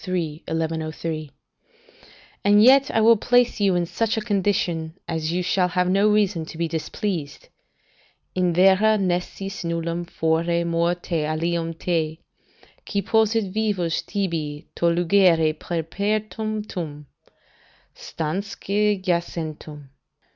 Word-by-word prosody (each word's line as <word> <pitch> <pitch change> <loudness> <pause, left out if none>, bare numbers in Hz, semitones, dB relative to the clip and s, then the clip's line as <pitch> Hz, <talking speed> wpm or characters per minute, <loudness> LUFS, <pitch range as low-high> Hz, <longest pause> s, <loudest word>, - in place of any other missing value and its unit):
1103] 160 -2 -3 1.1
"And 205 +1 +5
yet 270 +3 +6
I 225 - +1
will 230 +1 +6
place 245 +2 +2
you 195 -3 +3
in 175 -1 +1
such 220 +6 -1
a - - 0
condition 185 -6 -1
as 160 -1 -2
you 180 +1 -1
shall 180 +1 +2
have 180 0 0
no 200 +2 +4
reason 205 -5 +2
to 160 - -9
be 170 0 0
displeased. 160 -1 -4 0.8
"'In 180 -1 +1
vera 195 +5 +5
nescis 195 +1 -2
nullum 170 +1 -2
fore 170 +1 0
morte 170 -1 0
alium 165 +2 -1
te, 160 -2 -1 0.6
Qui 200 -1 -2
possit 220 -2 +1
vivus 200 -6 0
tibi 165 -6 -3
to - - -2
lugere 170 -2 +3
peremptum, 200 -1 -3 0.9
Stansque 200 +5 -2
jacentem. 160 -5 -3
175 Hz, 110 wpm, -23 LUFS, 165-200 Hz, 1.1 s, yet